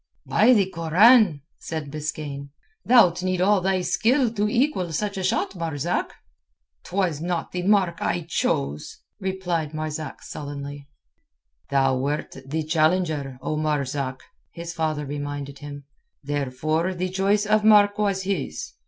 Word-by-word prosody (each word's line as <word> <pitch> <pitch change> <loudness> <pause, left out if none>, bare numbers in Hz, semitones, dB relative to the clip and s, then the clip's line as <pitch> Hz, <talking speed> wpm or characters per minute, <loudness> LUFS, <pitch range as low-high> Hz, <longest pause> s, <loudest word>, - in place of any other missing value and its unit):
"By - - +4
the 205 -5 +4
Koran," 185 - +4 0.2
said 155 -4 -5
Biskaine, 150 -2 -5 0.3
"thou'lt 200 -8 +5
need 185 0 -1
all 195 +1 +3
thy 190 0 +1
skill 235 +5 +2
to 210 -1 0
equal 235 - 0
such 205 +5 -2
a 190 - -3
shot, 185 - 0
Marzak." 165 -1 -2 0.7
"'Twas 180 -6 -1
not 175 -1 -2
the 180 - -3
mark 185 -3 +2
I 175 - 0
chose," 75 - -2 0.2
replied 175 -5 -2
Marzak 155 0 -5
sullenly. 140 -1 -7 0.8
"Thou 135 -2 +2
wert 145 +3 -2
the 155 +3 -2
challenger, 155 -4 +1
O 155 - -1
Marzak," 140 -3 -2 0.3
his 170 0 -7
father 155 -2 -2
reminded 145 -1 -5
him. 145 0 -8 0.4
"Therefore 145 +5 -1
the 185 +1 -2
choice 195 +3 +1
of 215 0 +2
mark 205 -1 +5
was 200 -2 0
his. 185 -7 -3
165 Hz, 135 wpm, -24 LUFS, 145-190 Hz, 0.8 s, thou'lt